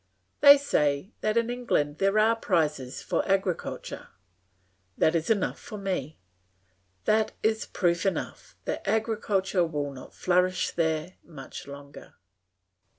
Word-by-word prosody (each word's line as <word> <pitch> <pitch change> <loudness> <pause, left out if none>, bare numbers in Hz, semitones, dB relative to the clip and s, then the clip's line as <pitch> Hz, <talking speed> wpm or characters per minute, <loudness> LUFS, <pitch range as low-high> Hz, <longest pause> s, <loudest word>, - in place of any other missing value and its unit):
They 285 0 +10
say 150 - 0
that 215 +1 +1
in 235 +1 +1
England 155 -12 -1
there 195 +2 +2
are 220 +2 +4
prizes 155 - -1
for - - 0
agriculture; 190 -2 -2 0.9
that 160 - +3
is 165 -1 -1
enough 210 -4 +1
for 215 - -8
me; 185 -7 -3 0.9
that 215 0 +2
is 220 0 +1
proof 170 -1 0
enough 195 - -3
that - - -2
agriculture 205 -3 +1
will 145 -4 -3
not 130 - -12
flourish 185 0 +1
there 160 +1 -1
much 140 -6 -10
longer. 140 0 -11
185 Hz, 125 wpm, -27 LUFS, 155-215 Hz, 0.9 s, They